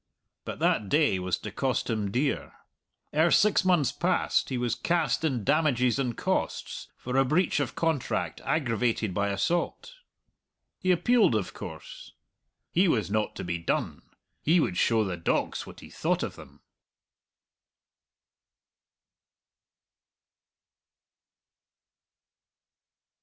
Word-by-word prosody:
But - - -5
that 105 - +1
day 145 -11 +3
was 90 -1 -1
to - - -7
cost 130 -2 -1
him 110 -4 -1
dear. 135 +7 -1 0.6
Ere 160 +3 +4
six 210 +3 +4
months 175 -8 +3
passed - - 0
he 130 - -2
was 120 -2 0
cast 165 -5 0
in 130 -8 0
damages 130 -3 +2
and 125 -4 -1
costs - - -2
for 125 +1 -5
a 135 - +6
breach 155 +5 +1
of 130 -3 -2
contract 160 -6 -1
aggravated 115 - 0
by 100 +2 0
assault. 170 - -1 0.9
He 185 - -2
appealed, 215 - +3
of 105 -4 -2
course. - - -9 0.6
He 185 +3 +3
was 110 - +1
not 110 0 0
to - - -5
be 85 -1 -3
done; 85 - -2 0.4
he 170 +4 +3
would 95 - 0
show 115 +2 +3
the 95 -4 -3
dogs 85 - -1
what - - -12
he - - -13
thought - - 0
of - - -4
them. - - -14
125 Hz, 120 wpm, -28 LUFS, 110-160 Hz, 0.9 s, a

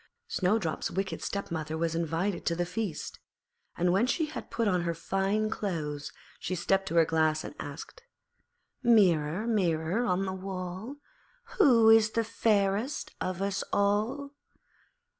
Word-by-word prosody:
Snowdrop's 185 -3 0
wicked 190 +1 -3
stepmother 160 -5 -3
was 165 0 0
invited 170 +3 -1
to 170 - +2
the 175 +1 -1
feast; 185 -1 -4 0.6
and 175 +1 +2
when 210 +6 +3
she 320 +4 +1
had 305 - -7
put 230 -1 0
on 180 -3 +2
her 170 -1 -2
fine 195 +5 0
clothes 150 -9 -3 0.3
she 185 - -3
stepped 190 +2 +1
to 170 - -3
her 165 -1 +6
Glass 155 -1 +1
and - - -7
asked 150 - -8 0.8
'Mirror, 190 - +3
Mirror 185 -2 +1
on 190 -3 +1
the 190 - -3
wall, 190 +5 -5 0.6
Who 235 - +7
is 225 -1 +6
fairest 220 +2 0
of 185 +1 -2
us 200 -1 -1
all?' 210 +8 0
190 Hz, 140 wpm, -29 LUFS, 170-220 Hz, 0.8 s, Who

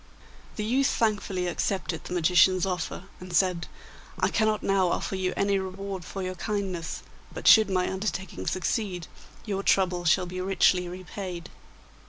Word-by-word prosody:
The 210 - -3
youth 265 +5 +2
thankfully 200 -4 0
accepted 175 -2 -2
the - - -5
magician's 180 +2 +4
offer, 180 -1 -3 0.2
and 180 -1 -6
said, 180 -2 +2 0.5
'I - - +2
cannot 215 -1 +1
now 195 -2 +3
offer 185 - -1
you 185 -1 -1
any 200 0 +2
reward 190 0 -5
for 195 +3 -6
your 185 0 -3
kindness, 185 -3 -3 0.3
but - - -4
should 220 -2 +8
my 185 -1 +1
undertaking 190 - -4
succeed 185 -2 -1 0.4
your 200 -3 -2
trouble 185 -3 +2
shall 180 +3 +4
be 185 +1 -5
richly 185 -1 +3
repaid. 180 -1 -7
185 Hz, 150 wpm, -27 LUFS, 180-195 Hz, 0.5 s, should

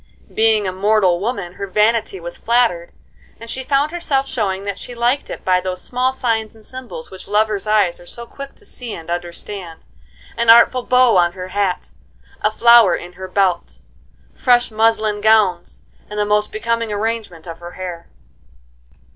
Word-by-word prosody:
Being 220 -2 +2
a - - -1
mortal 190 -2 +2
woman, 200 -4 -3
her 200 - -6
vanity 210 0 +1
was 175 0 -7
flattered, 230 -8 +1 0.5
and 230 0 -9
she 260 - -4
found 280 +3 +1
herself 290 -6 -1
showing 200 -7 -2
that 200 -1 -4
she 245 - -8
liked 240 +4 0
it - - -8
by 185 -1 +3
those 185 0 -4
small 255 +1 0
signs 225 -4 -2
and 220 -1 -19
symbols 255 -10 -9
which 190 - -11
lovers' 210 0 0
eyes 205 -5 +2
are 175 - -15
so 235 +5 -7
quick 275 +3 -10
to 420 - -19
see 245 - -7
and 165 +1 -8
understand,—an 175 - -6
artful 235 +2 +7
bow 250 -3 +4
on 175 -1 +3
her 185 0 -7
hat, 195 -2 -2 0.5
a 210 - +2
flower 235 -3 +6
in 175 +1 -8
her 185 +1 -8
belt, 185 - 0 0.6
fresh 245 -2 +2
muslin 215 -1 +1
gowns, 200 - +2 0.3
and 210 - -7
the 210 - +1
most 210 0 +1
becoming 230 0 -2
arrangement 210 -5 -3
of 165 -1 -8
her 175 0 -10
hair. 175 -2 -7
210 Hz, 170 wpm, -19 LUFS, 180-235 Hz, 0.6 s, artful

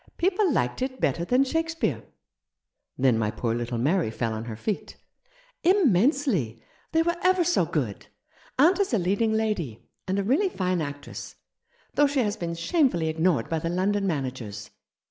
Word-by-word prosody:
People 380 +1 +2
liked 125 - 0
it 260 0 -3
better 165 +5 0
than 250 +9 +3
Shake 325 +4 -1
speare." 330 0 -1 0.5
" - - -57
Then 130 -3 +3
my 105 -2 +1
poor 115 +1 -2
little 120 0 -2
Mary 150 - +1
fell 115 0 -2
on 110 +1 -5
her 115 -2 -5
feet? 200 - -4 0.4
" - - -32
"Immensely. 235 - +2 0.3
They 325 0 +3
were 340 +1 0
ever 370 -1 +4
so 350 +1 +2
good. - - -3 0.5
Aunt 335 +9 +5
is 385 -11 +1
a - - +3
leading 200 +5 +1
lady, 210 - -1 0.2
and 190 +1 0
a 200 - +1
really 285 - +2
fine 185 - -1
actress, 145 -1 -7 0.6
though 290 - +4
she 280 -1 +1
has 210 -2 0
been 170 -5 -4
shamefully 175 - +1
ignored 160 -5 +1
by 165 - -1
the 165 - -3
London 195 +3 0
managers. 125 - -4
190 Hz, 175 wpm, -26 LUFS, -, 0.6 s, Aunt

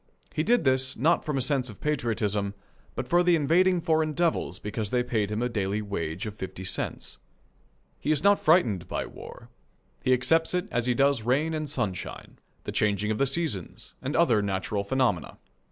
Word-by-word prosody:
He - - 0
did 235 +6 +3
this, 130 -1 +2
not 165 +7 +2
from 150 -3 -2
a 130 - +1
sense 130 -2 0
of 105 - -11
patriotism, 105 -8 -1 0.4
but - - -4
for 175 +1 +4
the 175 -1 +4
invading 175 +4 +3
foreign 160 -2 +1
devils 170 0 0
because 105 0 -4
they 125 +1 +1
paid 110 -4 -1
him 105 +3 -2
a - - +1
daily 105 -3 -1
wage 85 -3 -4
of 105 - -5
fifty 95 -2 -7
cents. 95 - -3 0.8
He 150 - -1
is 150 0 +1
not 200 0 +5
frightened 125 - +3
by - - -3
war. - - -11 0.5
He 130 - +2
accepts 160 +7 +2
it 180 +2 -1
as 120 0 0
he 125 - +2
does 140 -1 +3
rain 140 +8 +1
and 155 -2 -3
sunshine, 105 -10 -4 0.2
the - - -4
changing 105 0 +1
of 105 - -2
the 140 - +3
seasons, 135 - -3
and 140 +4 -3
other 125 -11 +4
natural 100 +1 -2
phenomena. 105 - 0
130 Hz, 185 wpm, -27 LUFS, 105-155 Hz, 0.8 s, not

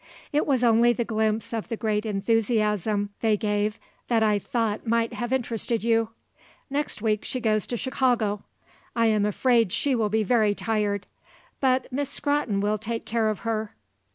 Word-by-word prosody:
It 295 - +2
was 260 -4 +2
only 235 0 +5
the 235 0 -2
glimpse 220 0 -1
of 225 -2 -3
the 230 - -4
great 215 -1 -1
enthusiasm 210 -1 +1
they 220 -2 +3
gave 210 0 -1 0.3
that 230 -2 +2
I 210 -1 +3
thought 225 +1 -2
might 230 0 +1
have 240 0 -4
interested 235 -3 -1
you. 225 -1 +2 0.6
Next 285 -6 -2
week 215 -2 +1
she 255 - -3
goes 215 -3 +1
to 240 - -3
Chicago. 240 -6 0 0.5
I 230 -1 +3
am 215 -2 +3
afraid 230 -1 +2
she 280 +7 0
will 225 -4 +1
be 220 +1 +1
very 215 -2 +3
tired. 205 -2 -1 0.5
But 260 -1 +2
Miss 280 +1 -1
Scrotton 285 -9 0
will 210 +1 0
take 225 +2 -4
care 225 -1 +1
of 215 - -3
her. 220 -2 -3
225 Hz, 170 wpm, -25 LUFS, 210-240 Hz, 0.6 s, only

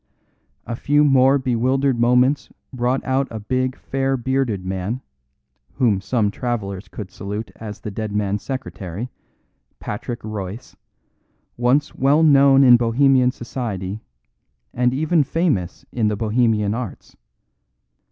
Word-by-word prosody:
A 115 - -4
few 145 +5 +2
more 135 -1 +5
bewildered 130 +1 +1
moments 125 +4 +3 0.2
brought 125 +1 -1
out 135 +1 +1
a 110 - -6
big 130 +4 -1
fair 135 0 -1
bearded 125 -6 -1
man, 95 +7 -3 0.7
whom 105 -7 +1
some 105 0 0
travellers 105 -5 -4
could 100 -4 -8
salute 105 +3 -6
as 105 -2 -8
the 105 - -5
dead 110 +1 -4
man's 100 -1 -1
secretary, 120 -5 -6 0.7
Patrick 120 +3 -5
Royce, 110 +2 -6 0.8
once 130 +5 +1
well 145 +4 +3
known 140 -2 +6
in 125 -2 +8
Bohemian 125 +2 +3
society 110 -5 -5 0.7
and 125 0 +2
even 155 +5 +2
famous 140 - -1
in 115 -3 0
the 105 - 0
Bohemian 110 -2 +1
arts. 115 -4 -7
120 Hz, 125 wpm, -21 LUFS, 105-135 Hz, 0.8 s, in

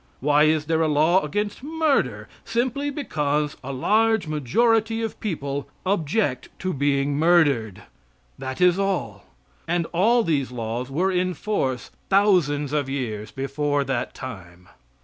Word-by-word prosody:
Why 150 +2 +4
is 155 -1 +2
there 160 +1 +1
a 160 - +3
law 155 +5 +3
against 205 - -3
murder? 310 0 0 0.2
Simply 260 +5 -1
because 150 - -1
a 135 - -5
large 215 +8 +2
majority 225 - +1
of 225 - -4
people 140 -8 -3 0.2
object 170 - 0
to 185 -1 -3
being 140 0 0
murdered. 145 - +2 0.6
That 130 0 -5
is 180 +1 +4
all. 120 - -2 0.4
And 170 0 0
all 230 +7 +3
these 145 -7 0
laws 120 +1 -4
were 180 +8 0
in 180 0 0
force 135 - -2 0.2
thousands 170 -8 +3
of 145 -3 0
years 110 -6 -4
before 140 +3 -1
that 135 -3 -3
time. 90 -8 -9
150 Hz, 135 wpm, -23 LUFS, 135-195 Hz, 0.6 s, Why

